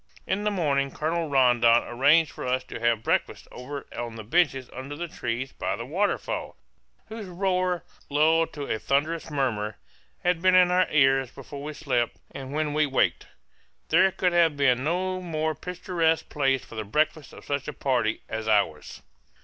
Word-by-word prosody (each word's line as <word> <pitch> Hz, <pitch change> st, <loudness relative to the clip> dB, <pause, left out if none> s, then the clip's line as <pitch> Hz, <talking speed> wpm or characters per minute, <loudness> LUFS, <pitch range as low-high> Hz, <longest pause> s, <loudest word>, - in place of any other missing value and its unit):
In 205 Hz, +2 st, -1 dB
the -, -, +3 dB
morning 145 Hz, -8 st, 0 dB
Colonel 160 Hz, +3 st, -2 dB
Rondon 120 Hz, -3 st, +4 dB
arranged 145 Hz, +6 st, +3 dB
for -, -, -6 dB
us 130 Hz, 0 st, 0 dB
to -, -, -8 dB
have 115 Hz, -1 st, +1 dB
breakfast -, -, -1 dB
over 140 Hz, +3 st, -7 dB
on 120 Hz, -1 st, -5 dB
the 110 Hz, -, -7 dB
benches 135 Hz, 0 st, +1 dB
under 135 Hz, +3 st, -7 dB
the 170 Hz, +3 st, -4 dB
trees 125 Hz, -3 st, -4 dB
by -, -, -3 dB
the 115 Hz, -, -6 dB
waterfall, 190 Hz, +10 st, -2 dB, 0.5 s
whose 220 Hz, -2 st, -7 dB
roar, 180 Hz, -1 st, 0 dB, 0.3 s
lulled 160 Hz, +3 st, +3 dB
to 145 Hz, -, -5 dB
a 110 Hz, -, -2 dB
thunderous 155 Hz, +7 st, 0 dB
murmur, 115 Hz, -8 st, -1 dB, 0.5 s
had 180 Hz, -2 st, +1 dB
been 185 Hz, 0 st, +5 dB
in 180 Hz, -1 st, +6 dB
our 180 Hz, 0 st, +3 dB
ears 135 Hz, -3 st, +3 dB
before 140 Hz, +3 st, -10 dB
we 150 Hz, +1 st, -5 dB
slept 125 Hz, -6 st, -1 dB
and 135 Hz, -1 st, -8 dB
when 150 Hz, 0 st, -1 dB
we 150 Hz, 0 st, +2 dB
waked. 135 Hz, -, +1 dB, 0.6 s
There 190 Hz, -, +5 dB
could 180 Hz, -1 st, 0 dB
have 165 Hz, -4 st, +3 dB
been 130 Hz, -3 st, +3 dB
no 185 Hz, +4 st, -1 dB
more 160 Hz, -3 st, -1 dB
picturesque 170 Hz, -1 st, -1 dB
place 135 Hz, -3 st, 0 dB
for -, -, -14 dB
the 110 Hz, -1 st, -4 dB
breakfast 150 Hz, +6 st, -1 dB
of -, -, -13 dB
such 140 Hz, -1 st, -2 dB
a -, -, -2 dB
party 120 Hz, -6 st, 0 dB
as 110 Hz, 0 st, -4 dB
ours. 100 Hz, -8 st, 0 dB
145 Hz, 175 wpm, -26 LUFS, 125-170 Hz, 0.6 s, in